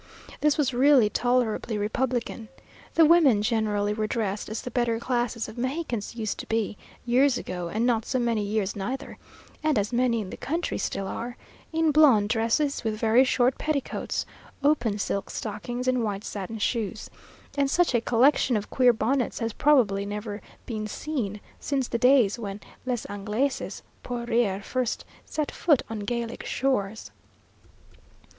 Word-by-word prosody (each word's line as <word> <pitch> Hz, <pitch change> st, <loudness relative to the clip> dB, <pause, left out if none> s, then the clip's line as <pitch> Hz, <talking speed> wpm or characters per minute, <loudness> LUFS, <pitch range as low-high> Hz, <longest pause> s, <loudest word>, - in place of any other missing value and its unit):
This 300 Hz, -1 st, +2 dB
was 275 Hz, -4 st, +1 dB
really 255 Hz, -4 st, +5 dB
tolerably 245 Hz, -3 st, +1 dB
republican. 230 Hz, +1 st, -2 dB, 0.5 s
The 330 Hz, -, +7 dB
women 295 Hz, -10 st, +5 dB
generally 210 Hz, -2 st, +1 dB
were 215 Hz, 0 st, -1 dB
dressed 210 Hz, -3 st, -2 dB
as 220 Hz, -, -4 dB
the 250 Hz, -, -6 dB
better 235 Hz, -1 st, +1 dB
classes 240 Hz, -2 st, -1 dB
of 220 Hz, +2 st, -9 dB
Mexicans 255 Hz, -5 st, -3 dB
used 220 Hz, -3 st, -3 dB
to -, -, -7 dB
be, 220 Hz, -2 st, -1 dB, 0.3 s
years 250 Hz, +2 st, +4 dB
ago, 180 Hz, -1 st, -4 dB
and 220 Hz, +6 st, 0 dB
not 230 Hz, -3 st, +1 dB
so 260 Hz, -, 0 dB
many 235 Hz, -3 st, +1 dB
years 205 Hz, -1 st, -1 dB
neither 240 Hz, +7 st, -5 dB, 0.4 s
(and 305 Hz, -4 st, +2 dB
as 205 Hz, +3 st, 0 dB
many 240 Hz, -1 st, +2 dB
in 190 Hz, -3 st, -5 dB
the -, -, -7 dB
country, 330 Hz, +5 st, -2 dB
still 195 Hz, -, -2 dB
are) 240 Hz, +4 st, -5 dB, 0.3 s
in 325 Hz, -1 st, +2 dB
blonde 265 Hz, -9 st, +5 dB
dresses, 235 Hz, +6 st, +1 dB
with 220 Hz, -1 st, -1 dB
very 225 Hz, +3 st, +5 dB
short 255 Hz, -1 st, +2 dB
petticoats, 300 Hz, -3 st, -2 dB, 0.4 s
open 280 Hz, -8 st, +2 dB
silk 200 Hz, -1 st, -2 dB
stockings 240 Hz, +4 st, -4 dB
and 255 Hz, -2 st, +2 dB
white 205 Hz, -2 st, -2 dB
satin 205 Hz, +2 st, -5 dB
shoes; 220 Hz, -1 st, -2 dB, 0.4 s
and 280 Hz, -1 st, +2 dB
such 345 Hz, 0 st, +2 dB
a 235 Hz, -, +3 dB
collection 250 Hz, 0 st, +3 dB
of 205 Hz, -, -6 dB
queer 250 Hz, -2 st, +5 dB
bonnets 245 Hz, +3 st, 0 dB
has 225 Hz, -1 st, -2 dB
probably 230 Hz, -10 st, +3 dB
never 205 Hz, +1 st, -5 dB, 0.2 s
been 215 Hz, -3 st, -4 dB
seen 215 Hz, -5 st, -3 dB, 0.2 s
since 270 Hz, -3 st, -1 dB
the 235 Hz, -, -2 dB
days 250 Hz, -4 st, +4 dB
when 200 Hz, -2 st, -5 dB, 0.3 s
les 245 Hz, -3 st, -1 dB
Anglaises 210 Hz, +7 st, -2 dB, 0.2 s
pour 240 Hz, -1 st, -4 dB
rire 225 Hz, -5 st, +1 dB
first 255 Hz, +2 st, -2 dB, 0.2 s
set 305 Hz, -2 st, -2 dB
foot 300 Hz, -7 st, +2 dB
on 220 Hz, -, -3 dB
Gallic 235 Hz, +2 st, -3 dB
shores. 220 Hz, -6 st, -1 dB
235 Hz, 160 wpm, -26 LUFS, 210-260 Hz, 0.5 s, The